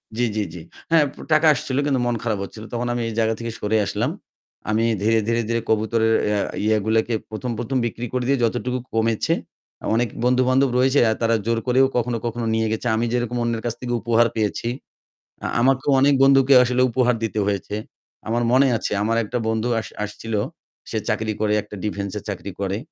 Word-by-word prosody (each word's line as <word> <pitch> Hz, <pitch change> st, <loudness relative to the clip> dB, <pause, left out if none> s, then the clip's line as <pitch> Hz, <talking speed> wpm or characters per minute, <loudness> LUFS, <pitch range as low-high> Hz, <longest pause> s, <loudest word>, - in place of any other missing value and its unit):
জী, 120 Hz, +1 st, +1 dB
জী, 105 Hz, -, +1 dB
জী। 90 Hz, -, -8 dB, 0.3 s
হ্যাঁ, 160 Hz, -3 st, +5 dB, 0.3 s
টাকা 155 Hz, +1 st, +5 dB
আসছিল, 130 Hz, 0 st, -3 dB
কিন্তু 135 Hz, -3 st, +1 dB
মন 120 Hz, -1 st, 0 dB
খারাপ 110 Hz, -4 st, -1 dB
হচ্ছিল। 110 Hz, +2 st, -9 dB
তখন 120 Hz, +1 st, -2 dB
আমি 120 Hz, -, -2 dB
এই 115 Hz, -, -5 dB
জায়গা 110 Hz, 0 st, +2 dB
থেকে 115 Hz, 0 st, -4 dB
সরে 105 Hz, +1 st, +1 dB
আসলাম। -, -, -1 dB, 0.6 s
আমি 110 Hz, +1 st, +2 dB, 0.2 s
ধীরে, 110 Hz, +2 st, +3 dB
ধীরে, 115 Hz, 0 st, +1 dB
ধীরে 115 Hz, 0 st, 0 dB
কবুতরের 110 Hz, +1 st, +2 dB, 0.2 s
আ -, -, +1 dB, 0.3 s
ইয়েগুলোকে 110 Hz, +2 st, +1 dB, 0.2 s
১ম, 115 Hz, +3 st, -4 dB
১ম 130 Hz, +2 st, -1 dB
বিক্রি 120 Hz, +1 st, -4 dB
করে 125 Hz, -, 0 dB
দিয়ে 140 Hz, -1 st, +2 dB
যতটুকু 125 Hz, +2 st, 0 dB
কমেছে। 115 Hz, -1 st, +1 dB, 0.6 s
অনেক 120 Hz, +1 st, +2 dB, 0.2 s
বন্ধুবান্ধব 130 Hz, +2 st, +3 dB
রয়েছে, 130 Hz, +2 st, +3 dB, 0.2 s
তারা 115 Hz, 0 st, +3 dB
জোর 115 Hz, 0 st, +1 dB
করেও 130 Hz, +2 st, +5 dB
কখনো, 120 Hz, -1 st, 0 dB
কখনো 120 Hz, 0 st, -2 dB
নিয়ে 110 Hz, 0 st, +1 dB
গেছে। 110 Hz, +2 st, -2 dB
আমি 115 Hz, -, 0 dB
যেরকম 120 Hz, 0 st, -1 dB
অন্যের 115 Hz, -1 st, -1 dB
কাছ 120 Hz, -, -1 dB
থেকে 120 Hz, -1 st, -3 dB
উপহার 115 Hz, +2 st, +3 dB
পেয়েছি, 110 Hz, +1 st, -1 dB, 0.8 s
আ -, -, 0 dB
আমাকেও 135 Hz, +2 st, +2 dB
অনেক 140 Hz, +1 st, +5 dB
বন্ধুকে 135 Hz, 0 st, +5 dB
আসলে 125 Hz, +1 st, +1 dB
উপহার 125 Hz, 0 st, +2 dB
দিতে 110 Hz, -1 st, -1 dB
হয়েছে। 100 Hz, 0 st, -2 dB, 0.5 s
আমার 120 Hz, +2 st, 0 dB
মনে 135 Hz, +2 st, +5 dB
আছে, -, -, -4 dB
আমার 115 Hz, +2 st, +1 dB
একটা 115 Hz, +4 st, -3 dB
বন্ধু 110 Hz, +1 st, 0 dB
আস 110 Hz, -, -6 dB, 0.2 s
আসছিল। 105 Hz, +2 st, -6 dB, 0.6 s
সে -, -, -2 dB
চাকরি 110 Hz, -1 st, -1 dB
করে, 105 Hz, -1 st, +2 dB
একটা 105 Hz, 0 st, -11 dB
ডিফেন্সে 100 Hz, -1 st, -3 dB
চাকরি 100 Hz, 0 st, -5 dB
করে। 100 Hz, 0 st, -1 dB
115 Hz, 185 wpm, -22 LUFS, 110-125 Hz, 0.8 s, হ্যাঁ